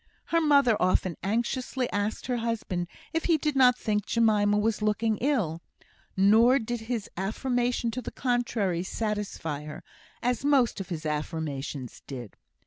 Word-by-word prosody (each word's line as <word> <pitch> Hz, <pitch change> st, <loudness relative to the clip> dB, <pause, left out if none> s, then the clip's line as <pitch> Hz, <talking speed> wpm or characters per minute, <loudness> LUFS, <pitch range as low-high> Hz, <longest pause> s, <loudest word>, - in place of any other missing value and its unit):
Her 335 Hz, 0 st, +3 dB
mother 280 Hz, -7 st, +5 dB
often 185 Hz, -1 st, +2 dB
anxiously 240 Hz, +5 st, -1 dB
asked 205 Hz, +1 st, -2 dB
her 250 Hz, -1 st, -1 dB
husband 225 Hz, -6 st, -2 dB, 0.3 s
if 325 Hz, -, -1 dB
he 330 Hz, -2 st, +4 dB
did 300 Hz, -1 st, -1 dB
not 250 Hz, -2 st, +6 dB
think 210 Hz, -4 st, -1 dB
Jemima 210 Hz, -3 st, +3 dB
was 215 Hz, +1 st, 0 dB
looking 215 Hz, +1 st, +1 dB
ill; 210 Hz, -, 0 dB, 0.6 s
nor 220 Hz, +7 st, +6 dB
did 240 Hz, -1 st, -3 dB
his 225 Hz, -2 st, -3 dB
affirmation 240 Hz, +4 st, -1 dB
to 255 Hz, +3 st, -4 dB
the -, -, -5 dB
contrary 235 Hz, -8 st, 0 dB
satisfy 190 Hz, -7 st, -3 dB
her, 150 Hz, -, -8 dB, 0.4 s
as 245 Hz, 0 st, 0 dB
most 275 Hz, -6 st, +3 dB
of 195 Hz, -, -6 dB
his 160 Hz, -3 st, -5 dB
affirmations 150 Hz, -4 st, -4 dB
did. 125 Hz, -6 st, -7 dB
220 Hz, 145 wpm, -27 LUFS, 185-245 Hz, 0.6 s, not